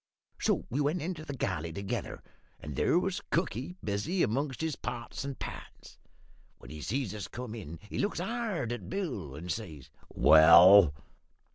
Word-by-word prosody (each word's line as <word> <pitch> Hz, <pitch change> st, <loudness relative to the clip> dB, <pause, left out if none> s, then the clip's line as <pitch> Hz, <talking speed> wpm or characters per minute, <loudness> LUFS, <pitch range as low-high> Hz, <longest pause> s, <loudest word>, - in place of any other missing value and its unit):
"So -, -, 0 dB
we 140 Hz, +5 st, 0 dB
went 150 Hz, +5 st, 0 dB
into 165 Hz, -1 st, -4 dB
the 145 Hz, -3 st, -6 dB
galley 85 Hz, -7 st, -2 dB
together, 100 Hz, +3 st, -5 dB, 0.4 s
and 75 Hz, -2 st, -7 dB
there 165 Hz, -, +2 dB
was 190 Hz, +2 st, -1 dB
cookie 170 Hz, 0 st, -2 dB
busy 110 Hz, -, -1 dB
amongst 135 Hz, +5 st, -1 dB
his 160 Hz, -3 st, -1 dB
pots 120 Hz, +1 st, -6 dB
and 140 Hz, -1 st, -5 dB
pans. -, -, -9 dB, 0.6 s
When 60 Hz, -, -13 dB
he 75 Hz, 0 st, -8 dB
sees 120 Hz, -, -2 dB
us 105 Hz, -2 st, -6 dB
come 120 Hz, -2 st, -7 dB
in, 90 Hz, -8 st, -8 dB
he -, -, -5 dB
looks 205 Hz, -2 st, -1 dB
hard 200 Hz, -, -2 dB
at 120 Hz, -, -6 dB
Bill, 125 Hz, -, -4 dB
and 80 Hz, +4 st, -8 dB
he 90 Hz, -, -3 dB
says 80 Hz, -, -7 dB, 0.3 s
"`Well?' 85 Hz, +3 st, +8 dB
120 Hz, 165 wpm, -30 LUFS, -, 0.6 s, `Well